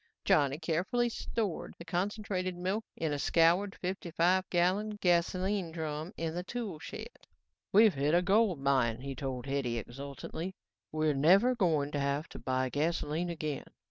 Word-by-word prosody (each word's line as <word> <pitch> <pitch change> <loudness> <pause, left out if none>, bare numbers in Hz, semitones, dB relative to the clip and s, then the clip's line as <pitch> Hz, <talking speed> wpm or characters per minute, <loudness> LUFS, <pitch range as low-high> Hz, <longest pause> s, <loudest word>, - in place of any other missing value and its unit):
Johnny 140 -1 +3
carefully 180 +10 0
stored 220 -5 -3
the 170 - -10
concentrated 185 0 -2
milk 190 +5 -1
in 160 -2 -1
a 145 - -2
scoured 175 +7 +3
fifty 185 -1 -4
five 180 +3 +2
gallon 190 +5 +1
gasoline 180 +1 +1
drum 160 +1 -4
in 160 -1 -2
the 175 - -2
tool 200 -4 -5
shed. - - -9 0.4
"We've 215 0 +7
hit 145 +4 +2
a 175 - +4
gold 200 -1 +3
mine," 130 -4 +2
he 140 0 -4
told 130 -2 -4
Hetty 135 -4 -1
exultantly. 140 - -6 0.4
"We're 155 -1 +1
never 190 - +5
going 160 - +1
to 145 - -1
have 140 +2 -1
to - - -9
buy 130 +1 0
gasoline 160 +4 -1
again. 155 -4 -4
170 Hz, 155 wpm, -31 LUFS, 145-190 Hz, 0.4 s, We've